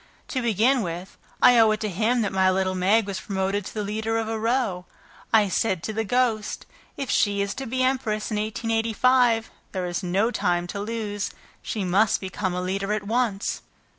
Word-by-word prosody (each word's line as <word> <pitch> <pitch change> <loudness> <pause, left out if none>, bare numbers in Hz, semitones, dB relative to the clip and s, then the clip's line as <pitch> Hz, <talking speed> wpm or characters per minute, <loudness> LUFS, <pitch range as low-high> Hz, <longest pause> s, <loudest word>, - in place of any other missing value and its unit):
To 260 - -1
begin 235 +3 +3
with, 175 0 -5 0.3
I 245 -1 +8
owe 225 -1 +6
it 215 0 +1
to 215 - -1
him 220 +5 +1
that 205 - -1
my 190 0 +4
little 185 0 +1
Meg 195 +4 +3
was 195 -2 -4
promoted 195 0 -2
to - - -6
be 215 - -4
the - - -3
leader 220 +2 -1
of 225 -1 -1
a 225 0 -2
row. 225 -6 0 0.5
I 215 -2 +5
said 190 -3 0
to 220 - -3
the 225 +1 -1
ghost, 225 -1 0 0.3
'If 275 -3 -3
she 205 -1 +2
is 200 0 -1
to 270 - -6
be 255 +2 0
empress 235 -5 0
in 210 - -1
1885, 225 +2 +2 0.2
there 185 -2 -2
is 175 -1 -2
no 195 +6 +1
time 175 -6 0
to 200 +3 -5
lose; 205 -1 -3 0.3
she 210 - -3
must 195 +4 +3
become 185 -1 -3
a 180 - -2
leader 195 +2 -2
at 210 -1 -2
once.' 220 -2 -1
215 Hz, 200 wpm, -25 LUFS, 190-225 Hz, 0.5 s, I